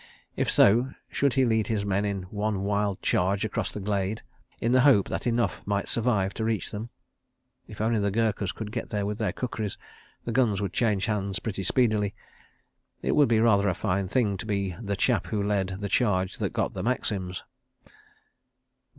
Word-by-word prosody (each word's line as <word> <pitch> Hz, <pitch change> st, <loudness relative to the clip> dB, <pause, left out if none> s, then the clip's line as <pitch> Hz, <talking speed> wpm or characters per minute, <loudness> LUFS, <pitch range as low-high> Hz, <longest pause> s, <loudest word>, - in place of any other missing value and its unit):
If -, -, 0 dB
so, 120 Hz, +6 st, +4 dB
should 140 Hz, -2 st, +1 dB
he 135 Hz, -1 st, +4 dB
lead 110 Hz, -2 st, +1 dB
his 105 Hz, -3 st, -1 dB
men 100 Hz, +1 st, 0 dB
in 100 Hz, -2 st, -2 dB
one 100 Hz, +1 st, -2 dB
wild 100 Hz, -1 st, -1 dB
charge 100 Hz, +4 st, +1 dB
across 110 Hz, -2 st, -2 dB
the -, -, -6 dB
glade, 100 Hz, +1 st, -2 dB, 0.4 s
in 115 Hz, -, 0 dB
the 130 Hz, 0 st, +5 dB
hope 125 Hz, -8 st, +5 dB
that -, -, -2 dB
enough 120 Hz, 0 st, 0 dB
might 100 Hz, -1 st, -1 dB
survive 110 Hz, -5 st, +2 dB
to 110 Hz, -, -3 dB
reach 110 Hz, -4 st, -1 dB
them? 110 Hz, +3 st, -5 dB, 0.8 s
If -, -, -11 dB
only 110 Hz, 0 st, +2 dB
the 100 Hz, 0 st, +1 dB
Gurkhas 105 Hz, -2 st, 0 dB
could 110 Hz, -2 st, -7 dB
get 115 Hz, 0 st, -4 dB
there 105 Hz, -1 st, -1 dB
with 105 Hz, +1 st, -3 dB
their -, -, 0 dB
kukris, 110 Hz, -5 st, -4 dB, 0.5 s
the 115 Hz, -, -2 dB
guns 115 Hz, -5 st, +2 dB
would 100 Hz, -3 st, -3 dB
change 105 Hz, -5 st, +1 dB
hands 100 Hz, -3 st, -1 dB
pretty 100 Hz, -3 st, -4 dB
speedily.... 105 Hz, -2 st, +1 dB, 0.9 s
It -, -, +1 dB
would 145 Hz, -5 st, +4 dB
be 115 Hz, -2 st, +4 dB
rather 100 Hz, -3 st, +4 dB
a 90 Hz, -, -1 dB
fine 100 Hz, 0 st, -1 dB
thing 105 Hz, -2 st, +1 dB
to 95 Hz, -, -6 dB
be 100 Hz, -4 st, -1 dB
"the 100 Hz, -2 st, -2 dB
chap 120 Hz, +3 st, +1 dB
who 105 Hz, -2 st, -1 dB
led 95 Hz, -2 st, -1 dB
the 100 Hz, -, -3 dB
charge 100 Hz, -3 st, +1 dB
that -, -, 0 dB
got -, -, -1 dB
the -, -, -4 dB
Maxims." 95 Hz, -7 st, -2 dB
105 Hz, 190 wpm, -27 LUFS, 100-115 Hz, 0.9 s, the